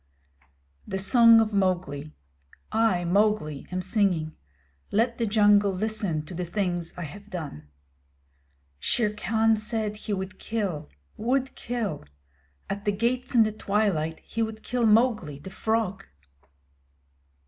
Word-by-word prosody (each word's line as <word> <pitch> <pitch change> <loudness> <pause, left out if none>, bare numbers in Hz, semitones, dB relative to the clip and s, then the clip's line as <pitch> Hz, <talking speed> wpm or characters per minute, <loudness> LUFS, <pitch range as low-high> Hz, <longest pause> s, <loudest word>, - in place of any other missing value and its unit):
The 190 - -2
Song 230 +3 +7
of 220 -1 +1
Mowgli 175 -7 0 0.6
I, 215 -5 +2
Mowgli 185 -6 +1
am 185 0 -2
singing. 180 -6 0 0.5
Let 235 +3 +1
the 230 - +1
jungle 205 -1 +4
listen 200 -6 -2
to 180 - -9
the 180 +1 -3
things 175 -2 -2
I 175 - -4
have 200 +7 -10
done. 150 - -7 1.1
Shere 210 - 0
Khan 220 +1 +2
said 215 -1 -3
he 210 0 -4
would 190 0 -5
kill 200 - -3 0.3
would 260 +3 0
kill! 225 -10 -3 0.6
At 200 +1 -5
the 205 - +3
gates 245 +5 -1
in 230 - +7
the 215 - 0
twilight 195 -7 0
he 230 - -4
would 220 -1 -3
kill 245 -2 +1
Mowgli, 215 - +3
the 190 +7 -10
Frog! 220 -2 -1
205 Hz, 130 wpm, -26 LUFS, 180-225 Hz, 1.1 s, Song